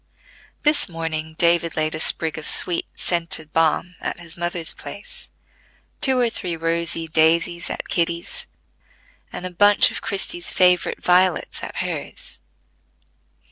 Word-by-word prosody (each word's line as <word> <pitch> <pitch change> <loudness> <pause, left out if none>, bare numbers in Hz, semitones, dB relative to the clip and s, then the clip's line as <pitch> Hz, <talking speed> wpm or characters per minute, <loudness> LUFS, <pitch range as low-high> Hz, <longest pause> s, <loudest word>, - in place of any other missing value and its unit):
This 295 -8 +3
morning 160 -1 -4
David 170 -1 +3
laid 155 0 0
a 155 - -2
sprig 160 0 +2
of 150 - -4
sweet 175 -2 +1
scented 165 -3 0
balm 165 +2 +1
at - - -4
his 170 -1 -6
mother's 175 -1 +1
place, 485 0 -8 0.7
two 265 -2 +3
or 245 -1 +3
three 180 -7 -4
rosy 165 0 -2
daisies 165 +2 +2
at - - -5
Kitty's, 170 - -2 0.8
and 180 - -5
a 185 - -4
bunch 205 +3 +5
of - - -6
Christie's 185 -3 0
favorite 180 -1 +2
violets 180 0 +2
at - - -7
hers. - - -5
170 Hz, 135 wpm, -21 LUFS, 165-180 Hz, 0.8 s, bunch